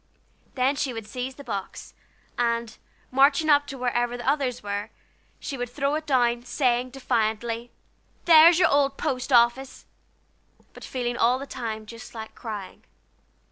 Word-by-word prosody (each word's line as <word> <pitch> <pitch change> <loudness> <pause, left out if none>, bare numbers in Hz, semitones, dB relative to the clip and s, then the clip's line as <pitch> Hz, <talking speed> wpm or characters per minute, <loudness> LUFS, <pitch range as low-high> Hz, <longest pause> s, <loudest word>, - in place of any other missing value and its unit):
Then 265 +2 +2
she 270 -2 -2
would 225 -2 -6
seize 250 +4 -5
the 280 - -11
box, 200 -6 -6 0.4
and, 235 -1 -1 0.4
marching 280 +4 +4
up 290 0 +4
to 275 -1 -7
wherever 245 -1 -1
the 240 - -8
others 255 -5 0
were, 205 +1 -4 0.5
she 275 - -6
would 245 -1 -3
throw 280 +3 -1
it 310 +1 -3
down, 240 -3 +2
saying, 250 -1 0
defiantly: 230 -2 -2 0.6
"There's 330 0 +8
your 365 - +4
old 280 -1 +2
post 270 -3 -3
office!" 245 +2 +2 0.9
but - - -13
feeling 245 -2 -3
all 245 +2 +3
the 275 - -7
time 225 -5 -5
just 230 +2 -11
like 220 -1 -8
crying. 210 -5 -8
250 Hz, 150 wpm, -25 LUFS, 235-275 Hz, 0.9 s, There's